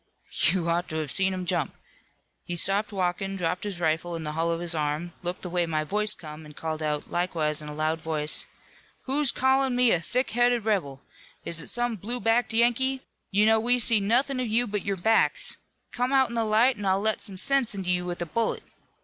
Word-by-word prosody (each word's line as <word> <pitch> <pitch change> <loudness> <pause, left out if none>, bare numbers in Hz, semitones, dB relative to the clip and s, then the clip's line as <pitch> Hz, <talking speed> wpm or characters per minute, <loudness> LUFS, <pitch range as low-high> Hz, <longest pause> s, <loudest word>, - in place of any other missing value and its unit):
"You 175 -1 0
ought 170 +1 -1
to 155 - -5
have 155 -3 -1
seen 190 0 +3
him 185 -1 -4
jump. - - -1 0.7
He 175 - -5
stopped 200 +4 +2
walkin', 195 0 -2
dropped 180 +1 -2
his 195 -4 -4
rifle 165 +1 -1
in 165 - -5
the 150 - -4
hollow 165 +2 -1
of - - -6
his 175 0 +1
arm, 155 +2 -2
looked 175 +1 -5
the 180 - -4
way 175 -1 0
my 155 -1 -1
voice 210 +5 +1
come 155 -3 -10
and 150 -1 -13
called 160 -1 -4
out, 150 -1 -3
likewise 160 -4 0
in 150 - -9
a - - -7
loud 155 +1 -1
voice: 155 -1 +1 0.6
'Who's 275 0 +2
callin' 265 0 +2
me 245 -2 +4
a 175 - +3
thick 255 +9 -1
headed 240 -1 +2
rebel? 145 -11 -1 0.4
Is 165 -1 +1
it - - -5
some 240 -2 -1
blue 235 +6 -5
backed 230 0 +1
Yankee? 245 +3 +2 0.3
You 205 +2 +3
know 220 0 +4
we 245 +3 +2
see 230 -2 +4
nothin' 250 +6 +1
of 250 - -1
you 230 +3 +2
but 205 -3 -3
your 200 -1 -2
backs. 225 +5 +2 0.3
Come 250 +2 -1
out 265 -2 +3
in - - -8
the 230 -1 0
light, 225 +4 +3
an' 205 - -5
I'll 190 0 +2
let 220 +1 0
some 195 -3 -2
sense 270 0 +1
into 185 -2 -2
you 180 0 0
with 175 -1 -4
a - - -5
bullet.' 225 +7 -1
195 Hz, 225 wpm, -26 LUFS, 165-235 Hz, 0.7 s, me